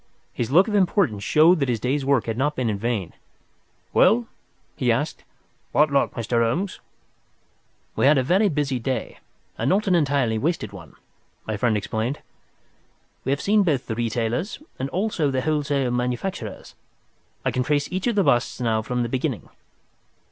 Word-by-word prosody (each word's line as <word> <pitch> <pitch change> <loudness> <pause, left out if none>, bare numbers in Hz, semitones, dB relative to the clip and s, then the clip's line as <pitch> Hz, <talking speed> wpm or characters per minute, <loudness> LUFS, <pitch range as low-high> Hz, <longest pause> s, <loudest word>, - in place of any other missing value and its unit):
His 120 -2 -2
look 180 - +5
of 215 - -3
importance 180 - +2
showed 160 +3 +5
that 140 -3 0
his 120 -2 0
day's 135 +5 -1
work 135 -3 +2
had 115 - -2
not 145 +5 0
been 120 -3 0
in 100 - -3
vain. 110 -5 -2 0.8
"Well?" 235 +2 +4 0.5
he 125 -3 +1
asked. 145 +7 -2 0.5
"What 150 0 +4
luck, 140 - +2
Mr. 115 0 0
Holmes?" 170 +13 -1 1.2
"We - - +3
have 145 0 +5
had - - +4
a - - -3
very 190 +9 +3
busy 140 -5 -1
day, 125 -1 -3 0.4
and - - +1
not 200 +2 +2
entirely 140 -10 +2
a - - -2
wasted 165 -3 -2
one," 85 -7 -12 0.5
my 110 - -2
friend 110 +1 +1
explained. 110 +6 -2 1.1
"We 135 - 0
have 140 - 0
seen 210 +1 +3
both 150 -9 +1
the 115 - -3
retailers 120 - -2 0.2
and 135 +1 -2
also 180 -4 0
the 130 -1 0
wholesale 145 -3 0
manufacturers. 125 - -3 0.7
I - - +2
can 130 - -1
trace 145 +2 0
each 185 +5 -2
of 235 - +1
the 200 - +3
busts 125 -6 +1
now 115 -3 +1
from 125 +2 -2
the - - -1
beginning." 125 +2 -3
135 Hz, 175 wpm, -23 LUFS, 120-155 Hz, 1.2 s, look